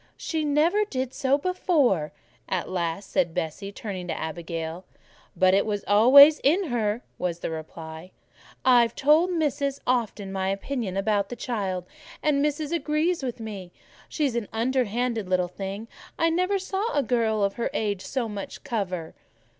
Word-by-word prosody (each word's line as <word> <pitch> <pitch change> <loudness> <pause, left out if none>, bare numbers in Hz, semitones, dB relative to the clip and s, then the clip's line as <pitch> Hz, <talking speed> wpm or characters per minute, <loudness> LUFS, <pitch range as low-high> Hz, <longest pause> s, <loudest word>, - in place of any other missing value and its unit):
"She 320 -2 -2
never 310 +8 +3
did 260 -10 -3
so 270 +1 +2
before," 290 - +1 0.4
at 185 -2 -1
last 170 +1 -3
said 175 -4 +1
Bessie, 195 +5 -3
turning 195 -3 -6
to - - -2
the - - -6
Abigail. 165 +1 -5 0.5
"But 185 0 +4
it 200 - +4
was 205 -2 -2
always 275 +9 +8
in 335 +5 +2
her," 225 -1 -1 0.2
was 175 -1 -2
the - - -3
reply. 160 +1 -8 0.6
"I've 240 -3 +5
told 310 +6 +4
Missis 285 -4 -1
often 220 -5 -1
my 190 0 -1
opinion 195 0 -3
about 200 0 +1
the 245 - -5
child, 195 -7 -3 0.4
and 295 -2 +2
Missis 300 +1 -1
agreed 320 +1 0
with 250 -3 -4
me. 200 -5 -7 0.4
She's 285 -6 -1
an 235 -4 -2
underhand 240 0 0
little 180 -1 +2
thing: 195 +4 -6 0.3
I 330 0 +2
never 365 +4 +1
saw 390 +4 -2
a 285 - +3
girl 225 -4 +1
of 200 0 +1
her 235 - -2
age 205 -3 -1
with - - -8
so 255 -4 -1
much 205 -2 -7
cover." 185 -7 -3
225 Hz, 160 wpm, -26 LUFS, 190-285 Hz, 0.6 s, always